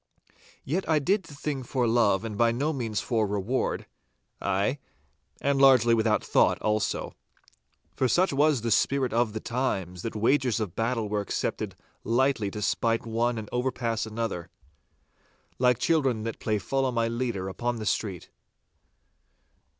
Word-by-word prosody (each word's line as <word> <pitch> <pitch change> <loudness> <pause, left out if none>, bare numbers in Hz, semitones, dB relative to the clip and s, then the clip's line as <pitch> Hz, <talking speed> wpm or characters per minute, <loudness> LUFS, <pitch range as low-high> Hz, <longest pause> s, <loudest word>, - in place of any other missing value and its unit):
Yet 165 +5 -2
I 160 - +4
did 190 +7 +1
the 145 - -12
thing 140 -1 -3
for 125 0 -1
love 115 -3 +3
and 110 -2 -4
by 115 +2 +3
no 140 +7 -1
means 115 -6 -2
for 110 -4 0
reward. 105 +6 -1 0.6
Ay, 100 +8 0 0.6
and 140 0 +1
largely 125 -4 +6
without 110 -1 +2
thought - - +3
also. 105 0 -1 0.8
For 130 - +2
such 175 +7 +2
was 145 -2 +3
the 115 0 -2
spirit 135 +2 +2
of 115 -2 +1
the 110 - -3
times, 95 -8 -2
that 115 - -5
wagers 120 +2 +2
of 105 -6 -4
battle 115 -1 -1
were 105 0 -1
accepted 100 - -3 0.3
lightly 120 -2 +1
to 105 +1 -5
spite 115 +2 0
one 115 +1 0
and 110 -1 -5
overpass 120 -3 -1
another, 110 -6 -4 1.1
like 125 -1 +4
children 130 -6 +1
that 115 0 -4
play 110 -1 0
Follow 135 +6 0
my 115 -1 +1
leader 115 -5 -2
upon 120 +5 -2
the 110 -2 -5
street. 95 -4 -2
115 Hz, 150 wpm, -27 LUFS, 110-130 Hz, 1.1 s, largely